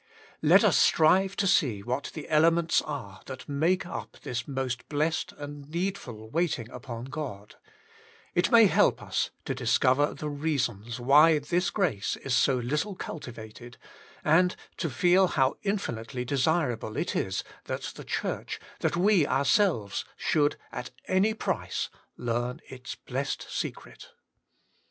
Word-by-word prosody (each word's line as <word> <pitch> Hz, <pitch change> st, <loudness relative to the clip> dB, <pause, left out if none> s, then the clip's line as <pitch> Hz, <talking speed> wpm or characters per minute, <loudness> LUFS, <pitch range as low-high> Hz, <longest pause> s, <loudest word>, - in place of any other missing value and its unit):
Let -, -, +6 dB
us -, -, +4 dB
strive 190 Hz, +5 st, +4 dB
to 200 Hz, -, 0 dB
see 120 Hz, -, +2 dB
what 125 Hz, +5 st, -2 dB
the 155 Hz, -, -6 dB
ele 155 Hz, +1 st, +5 dB
ments 170 Hz, 0 st, +2 dB
are 105 Hz, -11 st, -7 dB
that 130 Hz, -1 st, -8 dB
make 160 Hz, +6 st, +1 dB
up 175 Hz, -, -7 dB
this 120 Hz, -1 st, -4 dB
most 130 Hz, -3 st, -3 dB
blessed 155 Hz, +2 st, 0 dB
and 145 Hz, 0 st, -8 dB
needful 165 Hz, -, -4 dB
waiting 160 Hz, -9 st, 0 dB
upon 120 Hz, -1 st, -7 dB
God: 130 Hz, -8 st, -7 dB, 0.8 s
it -, -, +2 dB
may 230 Hz, -2 st, +8 dB
help 195 Hz, -, +3 dB
us -, -, -1 dB, 0.2 s
to -, -, -1 dB
discover 135 Hz, +3 st, +2 dB
the 150 Hz, -, -5 dB
reasons 140 Hz, -6 st, -2 dB
why 150 Hz, +6 st, +6 dB
this 175 Hz, +5 st, 0 dB
grace 150 Hz, -, 0 dB
is 130 Hz, -2 st, -2 dB
so 130 Hz, +2 st, +4 dB
little 150 Hz, -, -1 dB
cultivated, 120 Hz, -7 st, -8 dB, 0.5 s
and 180 Hz, +4 st, +4 dB, 0.2 s
to 165 Hz, -, -1 dB
feel 180 Hz, +8 st, +4 dB
how 135 Hz, -6 st, +1 dB
infinitely 125 Hz, -, -3 dB
desirable 130 Hz, -4 st, 0 dB
it -, -, -1 dB
is 95 Hz, 0 st, -1 dB, 0.2 s
that -, -, -4 dB
the -, -, -9 dB
Church, -, -, -3 dB, 0.2 s
that -, -, 0 dB
we 185 Hz, -4 st, +4 dB
ourselves, 140 Hz, -, +2 dB
should 145 Hz, -1 st, +2 dB, 0.2 s
at -, -, -5 dB, 0.2 s
any 200 Hz, +4 st, +2 dB
price -, -, -2 dB, 0.3 s
learn 120 Hz, +3 st, -2 dB
its 130 Hz, -1 st, -7 dB
blessed 135 Hz, +2 st, -4 dB
secret. -, -, -6 dB
145 Hz, 140 wpm, -28 LUFS, 125-170 Hz, 0.8 s, may